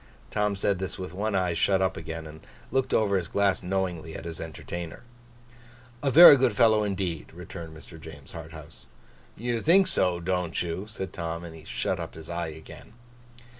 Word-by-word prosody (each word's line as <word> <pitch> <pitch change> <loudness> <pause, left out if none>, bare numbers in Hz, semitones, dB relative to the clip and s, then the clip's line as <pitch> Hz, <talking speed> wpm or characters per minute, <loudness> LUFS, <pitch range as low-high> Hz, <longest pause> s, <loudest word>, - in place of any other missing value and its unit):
Tom 105 -1 +1
said 95 -1 0
this 95 +1 -4
with 90 -2 -6
one 105 +2 -1
eye 90 -2 +1
shut 95 +3 +2
up 95 0 +1
again, 80 0 -6
and 80 0 -10 0.3
looking 135 +1 +2
over 100 -3 +2
his 90 -3 -2
glass 100 +1 +1
knowingly, 90 -4 -2
at - - -7
his 85 -2 -6
entertainer. 85 +2 -7 1.0
'A 140 - +1
very 155 +2 +11
good 125 -4 +2
fellow 110 -1 +5
indeed!' 95 -5 -3
returned 85 -2 -9
Mr. 80 +1 -13
James 70 -3 -11
Harthouse. 80 -2 -10 0.5
'You 120 0 -1
think 190 +4 +5
so, 90 - +1
don't 90 -1 -1
you?' 90 +4 -4
said 95 -3 -6
Tom. 85 -1 -4
And 80 -2 -10
shut - - -2
up - - -6
his 80 +1 -9
eye 85 0 -2
again. 80 +6 -11
90 Hz, 175 wpm, -27 LUFS, 80-100 Hz, 1.0 s, very